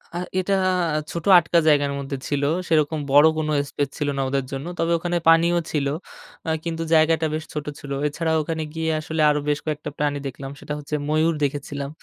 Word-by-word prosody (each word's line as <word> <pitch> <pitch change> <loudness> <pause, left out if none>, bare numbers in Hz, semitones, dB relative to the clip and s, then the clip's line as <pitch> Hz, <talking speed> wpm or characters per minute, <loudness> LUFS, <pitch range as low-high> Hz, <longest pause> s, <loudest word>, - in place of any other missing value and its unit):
আ - - -1 0.2
এটা 195 +2 0 0.6
ছোট 170 -2 -5
আটকা 170 0 +3
জায়গার 145 -2 +4
মধ্যে 140 0 -4
ছিল। 145 -1 -1 0.2
সেরকম 155 -1 +2
বড় 145 +3 +7
কোন 155 -1 -1 0.2
স্পেস 145 -1 -2
ছিল 150 - -1
না - - +1
ওদের 135 -1 -1
জন্য। 135 +1 -4
তবে 165 +1 +1
ওখানে 175 +1 -1
পানিও 170 +1 +5
ছিল। 140 -3 0 0.6
আ - - 0
কিন্তু 165 -1 -3
জায়গাটা 160 0 +4
বেশ 155 0 -2
ছোট 150 -1 -4
ছিল। 140 - -9 0.2
এছাড়া 160 +2 -2
ওখানে 160 +1 -3
গিয়ে 160 0 -2
আসলে 160 +1 -2
আরো 150 0 +2
বেশ 145 - +1
কয়েকটা 150 -1 -3
প্রাণী 145 -1 0
দেখলাম। 135 +1 -7
সেটা 150 - -6
হচ্ছে 150 +1 -4
ময়ূর 155 +1 +2
দেখেছিলাম। 140 0 -3
155 Hz, 190 wpm, -23 LUFS, 145-165 Hz, 0.6 s, বড়